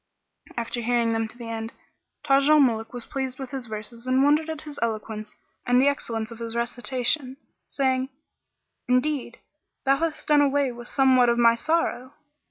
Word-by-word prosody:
After 235 +1 -2
hearing 235 -1 +1
them 225 0 0
to 220 - -13
the 240 - -8
end, 225 0 -5 0.5
Taj 275 0 +3
al 305 0 +7
Muluk 225 -5 +2
was 245 -2 -7
pleased 265 -2 -3
with 265 -2 -7
his 265 -3 -5
verses 220 +3 -7
and 260 +1 +3
wondered 300 +3 +3
at 315 -1 -5
his 295 -2 -8
eloquence 215 -1 -3 0.3
and 245 0 +3
the 270 - +4
excellence 230 -5 -2
of 230 - -10
his 230 0 -5
recitation, 250 +3 -1 0.3
saying, 260 -1 0 0.8
"Indeed, 255 0 0 0.5
thou 275 0 +4
hast 320 0 -3
done 295 -1 +5
away 280 -2 +2
with 240 0 -9
somewhat 260 -3 +4
of 235 - +2
my 235 -1 +6
sorrow." 270 -1 -1
250 Hz, 175 wpm, -25 LUFS, 230-275 Hz, 0.8 s, al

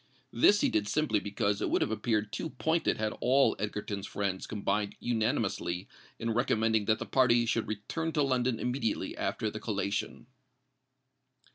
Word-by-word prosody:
This 205 0 +5
he - - +3
did 105 -1 0
simply 150 -5 +1
because 100 0 -1
it - - 0
would - - +2
have - - -2
appeared 110 -1 -1
too 160 - -3
pointed 160 +2 0
had 110 0 -1
all 135 +2 +4
Egerton's 105 -1 -3
friends 95 -2 -2
combined 105 -1 -1
unanimously 110 -6 -1 0.3
in 115 0 -2
recommending 110 -3 +2
that 110 0 +2
the - - -5
party 120 -3 +3
should 115 -1 0
return 135 +10 -3
to 150 - +2
London 130 -3 +1
immediately 125 -3 -2
after 110 - -2
the 110 - -6
collation. 105 -1 -3
110 Hz, 155 wpm, -30 LUFS, 105-125 Hz, 0.3 s, This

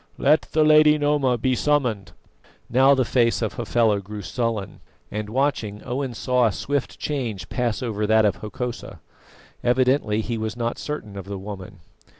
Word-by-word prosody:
Let 150 +3 +3
the 155 - +4
Lady 155 0 +6
Noma 145 -4 +1
be 130 +3 +1
summoned." 125 -8 0 0.6
Now 135 +3 +5
the 130 -2 +1
face 115 -1 +2
of 110 - -2
Hafela 115 -3 +1
grew 105 +1 -8
sullen, 115 -3 -3 0.3
and 105 0 -4
watching, 115 -5 -1
Owen 130 0 -3
saw 125 0 +2
a - - 0
swift 140 +9 -3
change 115 - -4
pass 120 -1 -1
over 105 -3 -2
that 110 0 +4
of 105 - +1
Hokosa. 120 +3 -6 0.6
Evidently 125 -3 +2
he 115 0 -3
was 110 +2 -4
not 120 0 -2
certain 110 -9 -6
of 100 -2 -7
the 100 0 -5
woman. 95 -3 -9
120 Hz, 160 wpm, -23 LUFS, 105-135 Hz, 0.6 s, Lady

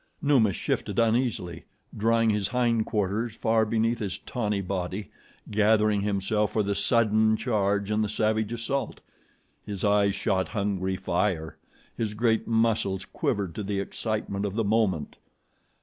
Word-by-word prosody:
Numa 135 -9 +3
shifted 90 - -2
uneasily, 115 -7 0 0.3
drawing 115 +1 +2
his 105 -2 0
hind 120 -3 +1
quarters 105 +2 -1
far 110 -1 +2
beneath 115 +1 +1
his 100 -4 -3
tawny 105 -5 -2
body, 95 +1 -4 0.4
gathering 105 0 +3
himself 105 +1 0
for 110 - +2
the 100 0 0
sudden 110 +1 +3
charge 100 -4 0
and 105 0 +2
the 105 - -2
savage 110 0 0
assault. 120 +2 -3 0.6
His 100 -2 -6
eyes 100 -1 +3
shot 95 -1 0
hungry 95 -2 -1
fire. 90 -3 -1 0.4
His 105 -2 -3
great 110 0 +1
muscles 110 -4 +1
quivered 95 -5 -2
to 105 - -5
the 100 0 -2
excitement 100 -1 -3
of 100 -1 -3
the 115 - +1
moment. 100 -7 0
105 Hz, 140 wpm, -27 LUFS, 100-115 Hz, 0.6 s, Numa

